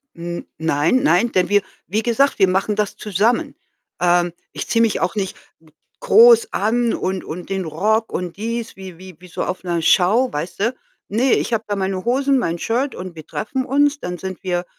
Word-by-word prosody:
hm, 170 +1 -6
nein, 160 - +2
nein, 240 -5 +3
denn 185 0 +1
wir 205 0 +4 0.3
wie 215 +5 -1
gesagt, 255 +4 +1
wir 190 - +5
machen 190 +3 0
das 210 -1 -1
zusammen. 210 +4 0 0.5
Ähm, 175 -1 +2 0.2
ich - - -6
ziehe 230 - +2
mich 230 -2 +2
auch 180 - -1
nicht 195 -3 -2
g - - -20 0.7
groß 465 -1 +7
an 230 +2 +1
und 190 0 -2
und 175 +3 -7
den 190 -2 -2
Rock 215 +8 0
und 180 -1 -4
dies, 230 +2 -4
wie 190 -3 -10
wie 185 0 -12
wie 180 - -14
so - - -3
auf 185 - -4 0.2
Show, 210 +10 +3
weißt 170 +5 -5
du? 230 +5 +1 0.3
Ne, 240 +5 +2
ich - - 0
habe 220 -1 0
da 205 - -1
meine 190 -1 -2
Hosen, 270 +2 +2
mein 170 -7 -2
Shirt 255 +8 -1
und 180 -1 -8
wir 155 -2 -10
treffen 260 +4 -3
uns. 285 +2 +2
Dann 180 -6 -5
sind 190 +1 -7
wir, 175 -1 -1
200 Hz, 200 wpm, -20 LUFS, 180-235 Hz, 0.7 s, groß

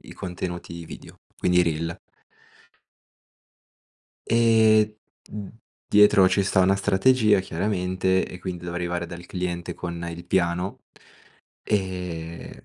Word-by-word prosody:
i - - -10
contenuti 85 -2 -6
video, 80 - -12 0.2
quindi 90 0 +2
i - - +6
reel. 85 0 -2 2.3
Ehm, 110 -2 +4 0.4
uhm, 105 +1 -8 0.3
dietro 105 -2 +6
ci 95 +1 +2
sta 95 - +1
una 95 +1 +4
strategia 105 +2 +3
chiaramente, 95 0 0
e 90 - -9
quindi 90 -2 -6
devo 85 0 -5
arrivare 85 0 -2
dal 85 +1 -9
cliente 90 -1 -4
con 85 0 -6
il 85 +1 -8
piano, 90 0 -1 0.8
ehm, 90 -5 -3
90 Hz, 115 wpm, -24 LUFS, 85-100 Hz, 2.3 s, i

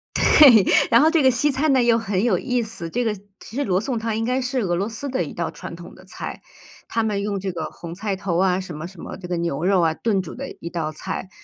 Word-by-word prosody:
对。 250 -9 +7 0.3
然 235 +1 +6
后 310 - +5
这 325 -1 +3
个 260 - +6
西 290 +5 +1
餐 285 +3 +1
呢， 260 - +4
又 235 -1 +4
很 205 -3 -1
有 220 -7 +3
意 250 +5 -1
思。 190 -7 -6
这 245 +8 -1
个 225 -2 0 0.3
其 220 - -12
实 285 - 0
罗 185 -5 +1
宋 245 +3 -2
汤 225 -1 -2
应 225 - -1
该 255 +2 0
是 255 +1 -1
俄 175 -5 0
罗 195 +5 -1
斯 255 +6 -5
的 260 0 -1
一 - - -7
道 - - -3
传 - - -8
统 - - -11
的 - - -16
菜。 - - -7 0.5
他 225 - +1
们 205 -2 -1
用 200 -1 -2
这 190 0 -3
个 165 -3 -4
红 170 -1 -8
菜 200 +2 -3
头 185 -3 -2
啊， 185 -1 +2
什 185 -4 -7
么 155 +3 -6
什 185 -1 -15
么 - - -7
这 180 - -9
个 175 -1 -2
牛 170 -3 -2
肉 190 0 +3
啊， 165 -1 +2
炖 200 +2 0
煮 175 - -9
的 275 +2 -6
一 170 - -6
道 160 -3 -2
菜。 170 +4 -6
205 Hz, 300 characters per minute, -22 LUFS, 180-245 Hz, 0.5 s, 对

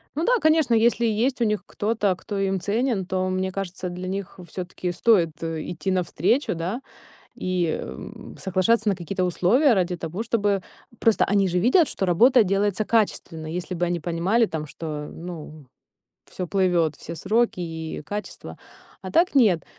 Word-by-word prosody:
Ну 320 +3 0
да, - - +4
конечно, 315 -5 +3
если 235 +1 +3
есть 230 +5 +1
у - - +5
них 210 -1 0
кто-то, 210 -3 0
кто 205 +2 -6
им 195 -1 0
ценен, 210 +1 0
то, 185 0 -1
мне 185 0 -1
кажется, 185 -1 -4
для 180 +1 -6
них 195 0 -5
всё-таки 180 +1 -4
стоит 175 -4 +2
идти 165 +3 -3
навстречу, 185 - +1
да. 180 +10 -3 0.5
И 180 -3 -1 0.6
соглашаться 200 +4 +1
на 200 - +1
какие-то 185 +2 -3
условия 215 - +3
ради 180 -3 +1
того, 170 +5 -5
чтобы 205 -4 +1 0.4
просто 225 -2 +3
они 200 -1 +2
же 180 0 +1
видят, 265 - +4
что 190 - -2
работа 235 +8 +5
делается 200 +1 0
качественно. 190 -8 0
Если 175 +3 -4
бы 175 0 0
они 175 0 -1
понимали 175 +8 +1
там, 155 -6 -5
что, 150 -1 -6
ну, 160 -3 -9 0.6
всё 185 - -5
плывёт, 175 -5 +2
все 165 - -8
сроки 225 +5 +1
и 160 -2 -5
качество. 205 +6 -7 0.4
А - - -7
так 340 +3 +3
нет. 205 - +4
190 Hz, 160 wpm, -24 LUFS, 175-220 Hz, 0.6 s, у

